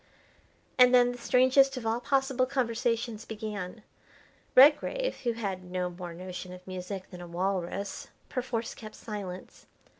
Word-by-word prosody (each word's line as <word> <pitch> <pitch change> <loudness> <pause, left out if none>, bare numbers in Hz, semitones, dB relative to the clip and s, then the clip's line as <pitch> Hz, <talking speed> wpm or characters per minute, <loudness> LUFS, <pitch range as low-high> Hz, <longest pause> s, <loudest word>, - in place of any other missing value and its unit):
And 250 0 +8
then 245 0 +5
the 245 - -8
strangest 260 +2 +4
of 240 - -5
all 225 +1 +1
possible 265 -1 +1
conversations 235 -3 -1
began. 210 -2 -6 0.7
Redgrave, 300 - +5
who 235 - +2
had 195 -5 -4
no 180 0 -3
more 175 0 -7
notion 180 +1 -7
of 180 0 -12
music 185 +1 -6
than 180 -1 -9
a 175 - -8
walrus, 190 +2 -2 0.2
perforce 240 -3 -3
kept 215 -2 -10
silence. 195 -4 -8
225 Hz, 140 wpm, -29 LUFS, 185-250 Hz, 0.7 s, And